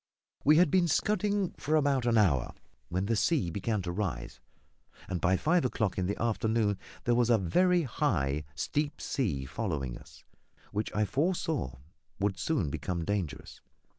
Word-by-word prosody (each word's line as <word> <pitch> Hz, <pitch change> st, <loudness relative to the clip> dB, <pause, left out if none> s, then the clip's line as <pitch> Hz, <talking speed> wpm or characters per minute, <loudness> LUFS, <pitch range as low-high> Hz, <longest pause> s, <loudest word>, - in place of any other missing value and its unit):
We 150 Hz, +2 st, +6 dB
had 170 Hz, -3 st, +5 dB
been 180 Hz, -2 st, +4 dB
scudding 205 Hz, +1 st, +1 dB
for 155 Hz, +2 st, 0 dB
about 140 Hz, -5 st, +2 dB
an 115 Hz, -1 st, +3 dB
hour 75 Hz, -, +2 dB, 0.3 s
when 90 Hz, +2 st, -1 dB
the 115 Hz, +2 st, +1 dB
sea 105 Hz, -, +1 dB
began 100 Hz, +2 st, -1 dB
to 85 Hz, -, -3 dB
rise, 85 Hz, -, -3 dB, 0.7 s
and 90 Hz, -2 st, -3 dB
by 95 Hz, +1 st, +3 dB
five 170 Hz, -, +2 dB
o'clock 110 Hz, -7 st, -1 dB
in 90 Hz, -, 0 dB
the 100 Hz, -, -2 dB
afternoon 110 Hz, -3 st, +1 dB, 0.2 s
there 120 Hz, -, +2 dB
was 120 Hz, 0 st, +3 dB
a 115 Hz, -, +6 dB
very 175 Hz, -, +3 dB
high, 75 Hz, -, 0 dB
steep 145 Hz, -, -2 dB
sea 80 Hz, -, -1 dB
following 70 Hz, -, -3 dB
us, -, -, -17 dB, 0.5 s
which 105 Hz, +1 st, -2 dB
I 105 Hz, 0 st, +2 dB
foresaw 150 Hz, -, -1 dB, 0.4 s
would 100 Hz, -1 st, 0 dB
soon 100 Hz, -, 0 dB
become 85 Hz, +1 st, -3 dB
dangerous. 95 Hz, -6 st, -3 dB
110 Hz, 160 wpm, -30 LUFS, 90-145 Hz, 0.7 s, We